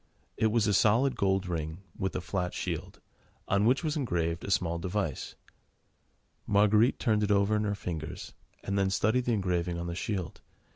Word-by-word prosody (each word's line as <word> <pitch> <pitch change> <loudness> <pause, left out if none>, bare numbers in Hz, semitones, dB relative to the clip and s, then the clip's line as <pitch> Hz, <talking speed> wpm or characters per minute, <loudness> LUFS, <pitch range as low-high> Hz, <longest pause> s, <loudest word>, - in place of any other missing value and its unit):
It 110 - +2
was 110 0 +2
a 105 - +2
solid 115 +7 +3
gold 95 0 +1
ring, 80 +1 -4
with 95 - -3
a - - -1
flat 90 0 -3
shield, - - -4 0.5
on 100 +2 +2
which 130 +7 +3
was 155 -1 -1
engraved 85 - -1
a - - -5
small 85 -3 +1
device. 90 -4 -3 1.1
Marguerite 105 +4 +4
turned 110 -4 +1
it 105 - 0
over 100 +1 +3
in 105 0 0
her 105 0 0
fingers, 80 -6 -6 0.3
and 100 0 -1
then 95 -1 +2
studied 110 +6 +1
the 120 - +1
engraving 90 -4 0
on 85 - -4
the 85 - -3
shield. 90 -2 -4
100 Hz, 180 wpm, -29 LUFS, 90-110 Hz, 1.1 s, Marguerite